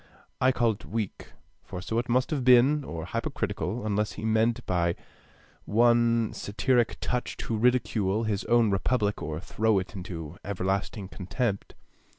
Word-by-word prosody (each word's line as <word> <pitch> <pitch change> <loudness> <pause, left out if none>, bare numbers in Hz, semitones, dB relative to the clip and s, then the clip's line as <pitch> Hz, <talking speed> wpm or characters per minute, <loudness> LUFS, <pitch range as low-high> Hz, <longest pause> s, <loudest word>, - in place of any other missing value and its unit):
I 130 - +5
call 120 -3 +2
it 105 - -8
weak, 110 -3 -5 0.3
for 90 - -7
so 110 +5 -1
it 120 0 -4
must 130 +3 +2
have 145 -4 -1
been, 130 +4 +5
or 85 -9 -6
hypocritical; 110 - -3
unless 105 -1 0
he - - -6
meant 110 +1 +1
by 85 -2 +1 0.7
one 115 0 +3
satiric 120 +3 0
touch 125 0 -2
to 115 - -3
ridicule 110 -3 +1
his 105 -2 -1
own 115 -2 +3
republic, 105 +1 0
or 75 +1 -4
throw 110 +3 +1
it 95 +3 -3
into 85 -3 -7
everlasting 100 +1 -2
contempt. 100 +3 -3
110 Hz, 150 wpm, -27 LUFS, 95-120 Hz, 0.7 s, I